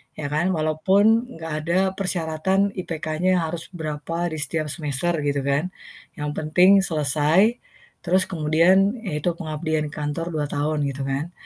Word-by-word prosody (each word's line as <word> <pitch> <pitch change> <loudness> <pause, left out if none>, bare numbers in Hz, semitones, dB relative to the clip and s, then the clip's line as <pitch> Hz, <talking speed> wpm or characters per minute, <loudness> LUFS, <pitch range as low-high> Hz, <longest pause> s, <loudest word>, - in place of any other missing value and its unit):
ya 145 -2 -5
kan. 155 +4 +1
Walaupun 195 +10 +2
enggak 165 0 -7 0.2
ada 175 +2 +2
persyaratan 190 +1 0
IPK-nya 165 0 -1
harus 165 +1 -4
berapa 165 +2 -3
di 155 - -4
setiap 150 +1 -1
semester 150 +1 -1 0.2
gitu 140 -1 0
kan. 140 +5 0 0.5
Yang 150 -4 -4
penting 180 +5 +4 0.2
selesai, 155 - +2 0.4
terus 185 +1 +3
kemudian 175 +6 +3
yaitu 170 -3 -2
pengabdian 155 -1 -2
kantor 150 +4 -4
2 155 -2 -1
tahun 145 0 -1
gitu 140 0 -4
kan. 135 +5 -3
160 Hz, 135 wpm, -23 LUFS, 150-180 Hz, 0.5 s, penting